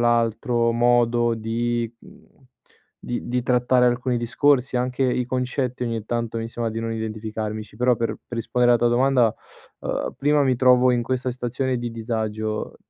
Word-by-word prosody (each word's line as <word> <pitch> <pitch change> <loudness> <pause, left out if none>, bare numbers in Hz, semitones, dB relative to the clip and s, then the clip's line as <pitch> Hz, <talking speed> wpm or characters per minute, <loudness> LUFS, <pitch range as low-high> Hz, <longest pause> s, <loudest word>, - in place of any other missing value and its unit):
l'altro, 115 0 +2
modo 120 0 +3
di 115 +1 -2
mhmm, - - -17 0.8
di 120 - -4
di 125 +1 0
trattare 125 0 +3
alcuni 125 +1 0
discorsi, 130 +2 +2
anche 125 +1 -1
i 125 -1 +1
concetti 125 0 -2
ogni 115 -3 -3
tanto 115 0 -2
mi 115 0 -4
sembra 115 0 -3
di 110 +1 -4
non 115 0 -3
identificarmici, 110 -1 -5
però 125 +2 +3
per 115 0 -1 0.2
per 120 - -6
rispondere 120 +2 +2
alla 120 - +1
tua 120 - +4
domanda, 125 -3 +3 0.5
uhm, - - -3
prima 145 +1 +3
mi 130 -2 +2
trovo 125 0 +5
in 120 -1 +1
questa 130 +1 -2
stazione 125 +1 -2
di 120 0 -4
disagio, 110 -2 -3
120 Hz, 165 wpm, -23 LUFS, 115-125 Hz, 0.8 s, trovo